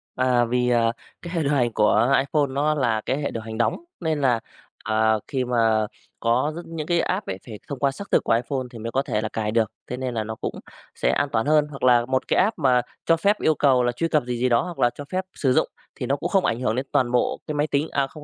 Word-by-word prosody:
À, 125 -1 +2
vì, 125 +1 +1
à, 115 -1 +3 0.3
cái 170 0 -7
hệ 165 -3 0
điều 140 - 0
hành 125 -4 +2
của 115 +5 +3
iPhone 145 +1 +1
nó 145 +3 +1
là 115 -6 +1
cái 130 - 0
hệ 140 - -2
điều 115 - -4
hành 110 0 -6
đóng 115 - +1 0.2
nên 160 -3 -1
là, 125 -4 +3 0.4
à, 110 0 +2
khi 130 -2 -1
mà 115 -3 +2 0.3
có 120 +6 +1
rất 170 - -5
những 165 -2 -6
cái 175 -1 +2
app - - -1
ấy 95 - -3
phải 110 -4 -9
thông 140 -3 -5
qua 140 0 +2
xác 200 +9 -9
thực - - +3
của - - +2
iPhone 130 +3 -1
thì 115 - -9
mới 115 +1 -5
có 135 - +1
thể 105 -5 -2
là 110 - -3
cài 110 -1 -2
được, 110 -2 +1 0.2
thế 125 - -4
nên 130 -1 -3
là 110 -2 -1
nó 110 +1 -5
cũng - - -5 0.4
sẽ - - 0
an 145 - 0
toàn 115 +1 +1
hơn, 150 0 +3
hoặc 140 -2 -9
là 120 -2 +5
1 130 +1 -1
cái - - +2
app 195 +1 +1
mà 130 -4 +4 0.2
cho 165 - +4
phép 200 +5 +2
yêu 155 - +3
cầu 130 -4 +3
là 120 - +2
truy 120 +7 -1
cập 150 -4 +2
gì 125 -1 -3
gì 125 +2 +1
đó, 120 -1 +4
hoặc 175 -2 -7
là 120 - +4
cho 145 - -7
phép 185 0 -1
sử 130 -3 +1
dụng - - +3 0.3
thì - - -4
nó 140 - +1
cũng 170 +5 -3
không 190 0 +2
ảnh 115 - 0
hưởng 125 -3 0
đến 130 +2 -2
toàn 120 -2 +2
bộ 125 - +1
cái 150 - -3
máy 145 +1 +1
tính, 145 +1 0
à, 140 -1 +1
không 150 +2 -12
130 Hz, 285 wpm, -24 LUFS, 115-150 Hz, 0.4 s, là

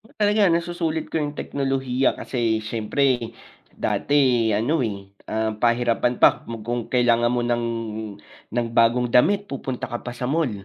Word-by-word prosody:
Talaga 210 -1 +3
nasusulit 170 -1 -1
ko - - -5
yung 145 0 -3
teknolohiya 135 -2 -1
kasi 115 -3 -1
siyempre 120 +4 0 0.7
dati 130 -5 +2
ano, 135 +8 +1
eh, 105 -3 -2 0.3
ah, 110 0 -1
pahirapan 120 0 +2
pa - - +9 0.2
mo 115 - -4
kung 120 0 -1
kailangan 120 -1 +3
mo 120 - +1
ng 120 0 0 0.9
ng 120 -1 0
bagong 120 +2 +4
damit 200 +11 +4
pupunta 130 -2 -4
ka 120 - -2
pa 120 - -4
sa - - -4
mall 160 -6 +1
125 Hz, 145 wpm, -23 LUFS, 120-145 Hz, 0.9 s, pa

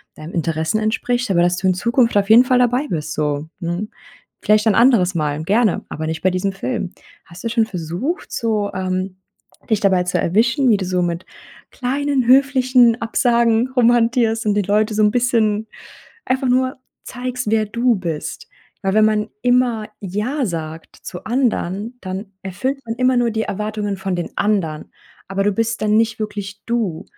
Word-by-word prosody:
deinen 155 +3 -10
Interessen 165 +4 -1
entspricht. 245 +2 -1
Aber 170 - +3
dass 175 +1 +2
du 190 - 0
in 185 - +4
Zukunft 235 +4 +1
auf 200 0 +1
jeden 235 +3 +8
Fall 255 0 +3
dabei 250 +4 +2
bist, 155 -2 -3
so, 150 0 -2
mhm. 175 +5 -3 0.5
Vielleicht 215 +1 +3
ein 210 - +4
anderes 220 -7 +4
Mal 150 -1 -1
gerne, 215 +3 +1
aber 155 +1 -5
nicht 160 0 -3
bei 185 - +4
diesem 190 +2 -1
Film. 195 -2 -3 0.3
Hast 170 +1 -13
du 230 - -1
schon 230 -1 +2
versucht, 185 - -4
so, 215 -3 -1
ähm, 185 0 -3 0.5
dich 220 -2 +2
dabei 190 -3 +3
zu 180 - -1
erwischen, 235 - +2
wie 215 - +5
du 195 - -3
so 180 0 0
mit 175 0 -2 0.5
kleinen 270 0 -1
höflichen 255 -3 +4
Absagen 235 0 +2
rumhantierst 235 -2 +3
und 210 - +2
die 205 - +2
Leute 210 +3 +1
so 215 - +2
'n 210 - +5
bisschen 225 -3 +1 0.6
einfach 260 0 0
nur 255 +1 +1 0.3
zeigst, 250 -2 -4
wer 220 -1 +2
du 235 +2 +1
bist. 170 -5 -5 0.3
Weil 195 -1 0
wenn 215 0 +5
man 215 0 0
immer 245 -3 +2
ja 215 +9 -2
sagt 160 -3 -6
zu 175 - -8
anderen, 230 -2 -1
dann 190 +1 -6
erfüllt 205 +9 -3
man 225 - -3
immer 255 +1 +2
nur 235 -1 +2
die 220 0 -1
Erwartungen 210 -1 -3
von 190 -1 -2
den 175 - -4
anderen. 175 -8 -1 0.4
Aber 195 0 -1
du 205 - +2
bist 230 +2 -1
dann 215 0 +2
nicht 225 0 +1
wirklich 205 -1 -5
du. 225 -9 -2
215 Hz, 175 wpm, -19 LUFS, 185-240 Hz, 0.6 s, jeden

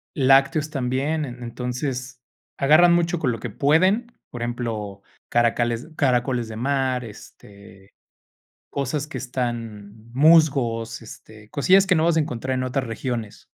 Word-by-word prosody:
lácteos 135 +2 +3
también. 140 +3 -1
En 125 -2 -8
entonces, 125 +1 -5 0.4
agarran 155 +5 +5
mucho 175 0 +1
con 135 -6 0
lo 115 - -5
que 120 - -5
pueden, 185 - +2 0.2
por 120 - -7
ejemplo, 110 -5 -4 0.3
caracoles- 120 +2 +1
caracoles 125 -3 +1
de 110 - -8
mar, 130 0 -1
este, 100 -2 -15 0.8
cosas 140 +2 -3
que - - -7
están 115 -4 -5
musgos, 130 -6 +3
este, 110 -1 -13
cosillas 190 +6 +4
que 185 - +3
no 160 - +2
vas 170 -1 +2
a - - +4
encontrar 130 -3 -2
en 130 - -1
otras 130 +1 -2
regiones. 115 -2 -5
125 Hz, 135 wpm, -23 LUFS, 115-145 Hz, 0.8 s, agarran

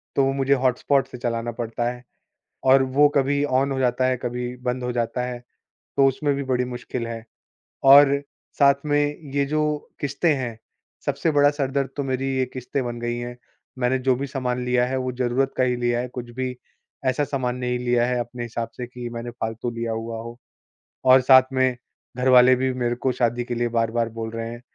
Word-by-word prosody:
तो 140 - +4
वो 135 - +2
मुझे 135 0 +2
हॉटस्पॉट 130 +1 +1
से - - -9
चलाना 120 -1 -2
पड़ता 120 0 -2
है, 125 0 -11 0.6
और 135 0 +6
वो 135 +3 +4
कभी 140 +1 +2
ऑन 135 0 +1
हो 135 - -1
जाता 125 0 +1
है 130 0 +1
कभी 125 0 -4
बंद 125 +1 -1
हो 125 - -1
जाता 120 +1 -1
है 125 -1 -5 0.6
तो 140 - +6
उसमें 140 +2 0
भी 140 - -3
बड़ी 125 -1 0
मुश्किल 120 -1 -5
है। 115 -1 -6 0.6
और 140 +1 +9 0.5
साथ 140 -1 +6
में 145 0 +2 0.3
ये 140 0 +2
जो 155 +2 0 0.4
किस्तें 145 +4 +1
हैं, 120 -5 -4 0.5
सबसे 145 +3 0
बड़ा 145 0 +5
सर 145 -2 -2
दर्द 140 -1 0
तो 145 - -1
मेरी 130 0 -2
ये 130 - +2
किस्तें 130 +1 -3
बन 120 -1 -5
गयी 120 0 -2
है। 120 0 -6 0.4
मैंने 125 +1 +2
जो 130 - +6
भी 140 +3 -3
सामान 125 -2 -2
लिया 125 0 +2
है 130 +1 -2
वो 130 0 -2
ज़रूरत 130 +2 +1
का 130 - +4
ही 125 -1 +1
लिया 120 0 0
है, 125 - -4
कुछ 125 -1 -7
भी 130 -1 -3 0.5
ऐसा 130 +3 +2
सामान 130 -3 -2
नहीं 125 -1 -2
लिया 120 -1 +1
है 125 0 0
अपने 120 +1 -6
हिसाब 115 0 -4
से 125 - -4
कि 125 0 -7
मैंने 120 +1 -5
फ़ालतू 115 0 -4
लिया 115 -1 -3
हुआ 115 0 -4
हो। 115 +1 -9 0.7
और 130 0 +7
साथ 130 0 +8
में 130 -1 +2 0.4
घर 125 +1 +1
वाले 125 0 +7
भी 130 +1 0
मेरे 120 -1 -1
को 130 - +3
शादी 120 0 0
के 120 - -4
लिए 120 0 0
बार-बार 115 0 0
बोल 110 0 -3
रहे 115 0 -4
हैं, 120 0 -8
125 Hz, 210 wpm, -23 LUFS, 120-135 Hz, 0.7 s, और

